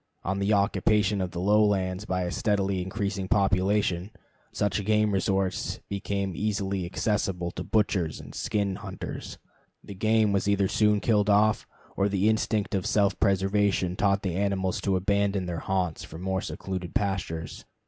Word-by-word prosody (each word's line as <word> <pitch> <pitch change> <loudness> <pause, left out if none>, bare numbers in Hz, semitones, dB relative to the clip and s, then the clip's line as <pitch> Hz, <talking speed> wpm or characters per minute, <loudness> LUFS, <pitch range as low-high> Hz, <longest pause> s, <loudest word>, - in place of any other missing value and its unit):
On 95 +1 -1
the 100 +2 +1
occupation 100 0 +2
of 90 - -1
the 90 0 -6
lowlands 100 -1 +2
by 90 -3 -1
a 90 - -3
steadily 100 -3 0
increasing 100 0 -3
population, 95 -2 +1 0.4
such 105 0 -1
game 105 +1 +2
resorts 95 -1 0
became 100 -1 -2
easily 100 -3 -1
accessible 95 -2 -1
to - - -6
butchers 95 -7 0
and - - -11
skin 100 -2 -1
hunters. 100 -3 -7 0.5
The - - -9
game 110 +2 +2
was 100 0 +1
either 100 -1 +2
soon 105 +1 +2
killed 105 -2 +2
off, 105 0 +3 0.3
or 100 +1 +1
the 100 +1 +1
instinct 110 -1 0
of 95 -3 0
self 100 -2 +2
preservation 95 -2 +1
taught 100 0 +1
the 90 -3 -2
animals 95 -1 0
to 100 -2 +1
abandon 100 0 +1
their 85 -2 -3
haunts 90 -4 -1
for 80 - -9
more 95 +2 -2
secluded 90 -3 -5
pastures. 90 -5 -2
100 Hz, 155 wpm, -27 LUFS, 95-105 Hz, 0.5 s, off